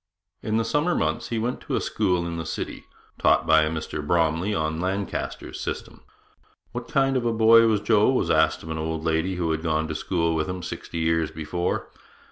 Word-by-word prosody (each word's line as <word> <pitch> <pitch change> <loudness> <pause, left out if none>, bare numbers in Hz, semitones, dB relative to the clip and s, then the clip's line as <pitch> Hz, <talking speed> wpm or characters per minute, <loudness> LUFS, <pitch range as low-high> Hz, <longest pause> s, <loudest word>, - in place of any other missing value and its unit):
In 110 0 -1
the 115 - +1
summer 150 +9 +1
months - - -1
he 115 - -1
went 120 +3 -2
to - - -3
a - - +2
school 90 -5 0
in 85 -1 -4
the 80 - -3
city, - - -5 0.3
taught - - +3
by 80 0 +5
a 75 - +1
Mr 80 -1 -4
Bromley 80 +4 +1
on 80 -4 -1
Lancaster's 95 +2 -3
system. - - -5 0.7
'What 120 -1 -6
kind 135 -2 +2
of 125 - +1
a - - +2
boy 115 +1 +6
was 105 -2 +2
Joe?' 105 0 +4
was 125 -10 +1
asked 80 0 +2
of 80 - -7
an 80 - -3
old 80 0 -3
lady 80 +3 0
who 85 -2 -1
had 80 0 -1
gone 80 -1 0
to - - -2
school 85 0 0
with 80 +2 -1
him 90 -1 -4
sixty - - -6
years 80 -1 +1
before. 80 +2 -3
85 Hz, 210 wpm, -25 LUFS, 80-110 Hz, 0.7 s, boy